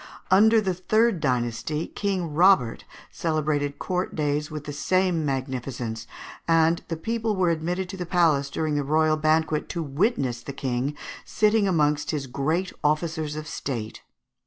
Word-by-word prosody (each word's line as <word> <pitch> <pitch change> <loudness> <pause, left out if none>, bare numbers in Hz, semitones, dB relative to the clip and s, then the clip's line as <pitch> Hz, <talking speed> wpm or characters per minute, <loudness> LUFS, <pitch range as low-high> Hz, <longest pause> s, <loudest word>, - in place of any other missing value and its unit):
Under 220 +4 +6
the 190 -3 0
third 215 +3 +2
dynasty 125 +3 -1
King 185 -6 -2
Robert 160 -8 +4 0.3
celebrated 150 -3 -1
court 180 -1 -2
days 150 -1 -1
with 155 -1 -6
the 145 - -6
same 180 +3 +1
magnificence, 130 -4 -3 0.4
and 165 0 +3
the 165 - -3
people 225 +4 -1
were 180 -3 +2
admitted 175 +3 -2
to 195 - -6
the 180 -2 -5
palace 155 -6 +2
during 155 +1 -2
the 145 -1 0
royal 155 +2 +2
banquet 155 0 +1
to 170 -2 -3
witness 140 - 0
the 140 - -7
King 135 +2 -2 0.3
sitting 215 -1 +2
amongst 150 -5 +1
his 145 -3 -2
great 155 +8 -1
officers 155 0 0
of 155 0 -5
state. 115 -8 -5
155 Hz, 150 wpm, -25 LUFS, 140-180 Hz, 0.4 s, Under